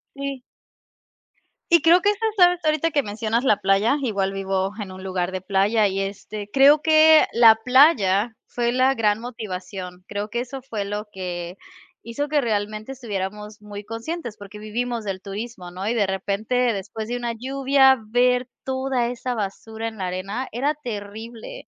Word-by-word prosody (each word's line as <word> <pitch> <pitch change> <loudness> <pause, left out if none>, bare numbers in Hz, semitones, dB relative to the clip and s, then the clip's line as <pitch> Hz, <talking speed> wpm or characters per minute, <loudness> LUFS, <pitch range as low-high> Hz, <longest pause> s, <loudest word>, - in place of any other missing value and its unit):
Sí. 275 -2 -5 1.3
Y 340 -2 +6
creo 340 +2 +6
que, 410 - +4
esta, 420 +2 -1
sabes 355 -1 +5
ahorita 310 +1 +2
que 285 -2 +1
mencionas 225 +2 -2
la 215 -6 +4
playa, 195 +7 +3
igual 200 -6 -1
vivo 195 0 -1
en 190 -2 -6
un 185 - -10
lugar 185 -1 -2
de 185 - -3
playa. 200 +3 +2
Y, 195 0 -2
este, 205 +1 -6
creo 285 +2 +6
que 315 0 +6
la 230 -2 +7
playa 235 - +4
fue 240 0 -1
la 260 +1 +3
gran 215 -3 +1
motivación, 185 -6 -7
creo 205 +1 -4
que 235 - -2
eso 260 +2 -6
fue 225 -6 -4
lo 205 +1 -5
que 180 -1 -6 0.5
hizo 285 +6 -3
que 300 0 +2
realmente 215 0 -2
estuviéramos 210 -3 -6
muy 205 0 -8
conscientes, 230 +2 -6
porque 205 +1 -11
vivimos 230 +2 -3
del 195 -1 -4
turismo, 200 -2 -7
¿no? 185 +3 -6
Y 235 - 0
de 210 -4 +2
repente 200 +5 -2 0.2
después 215 +2 -6
de 245 - -2
una 240 -1 -3
lluvia 265 +2 +3
ver 250 +2 +2 0.2
toda 260 -2 -1
esa 245 +1 -4
basura 220 +1 -5
en 220 -2 -10
la 185 - -2
arena, 195 +8 -4
era 280 +6 0
terrible. 230 - -8
220 Hz, 170 wpm, -23 LUFS, 200-260 Hz, 1.3 s, la